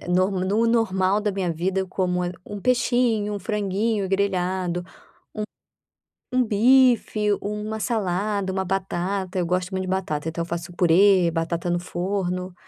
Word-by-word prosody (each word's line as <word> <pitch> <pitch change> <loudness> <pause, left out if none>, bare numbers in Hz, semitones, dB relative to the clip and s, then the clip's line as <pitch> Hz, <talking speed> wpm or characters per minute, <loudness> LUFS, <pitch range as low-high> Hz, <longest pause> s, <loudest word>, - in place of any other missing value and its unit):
eh, - - -11
no 190 +4 +1
normal 205 -4 +2
da 210 -1 -1
minha 185 -3 -1
vida, 185 +4 -1
eu 190 - -4
como, 180 -1 -1
eh, 175 - -3
um 205 -1 -6
peixinho, 240 -3 +1
um - - -3
franguinho 205 +1 -1
grelhado, 185 -2 0
um 185 - -20 1.3
um 255 0 +3
bife, 230 -1 +4
uma 210 +1 -4
salada, 200 -3 -1
uma 190 - -1
batata. 190 0 -2
Eu 175 - 0
gosto 180 +2 -1
muito 190 0 -2
de - - -5
batata, 165 -5 -2
então 170 +1 -3
eu - - -6
faço 170 +1 -5
purê, 180 0 +4
batata 170 +1 -2
no 175 - +1
forno. 180 0 -3
190 Hz, 155 wpm, -24 LUFS, 180-210 Hz, 1.3 s, bife